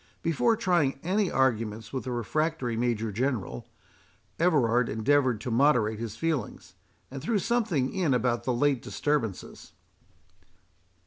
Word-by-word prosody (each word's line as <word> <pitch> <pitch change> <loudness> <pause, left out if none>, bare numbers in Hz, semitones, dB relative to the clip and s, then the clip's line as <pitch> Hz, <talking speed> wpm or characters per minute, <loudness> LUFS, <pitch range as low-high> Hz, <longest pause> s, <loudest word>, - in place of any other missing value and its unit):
Before 170 +8 +2
trying 175 -11 +1
any 190 +3 +1
arguments 115 -4 0
with 130 - -3
the 130 - -3
refractory 125 +1 -1
Major 115 -2 -1
General, 110 - -2 0.7
Everard 125 -9 +3
endeavoured 125 +1 +2
to 120 - -4
moderate 115 -4 +3
his 115 -2 -5
feelings, 165 -3 -3 0.4
and 135 0 -6
threw 210 - 0
something 200 - 0
in 180 -7 0
about 120 -1 0
the 130 - 0
late 135 +1 +1
disturbances. 140 -10 -3
130 Hz, 125 wpm, -27 LUFS, 115-160 Hz, 0.7 s, Everard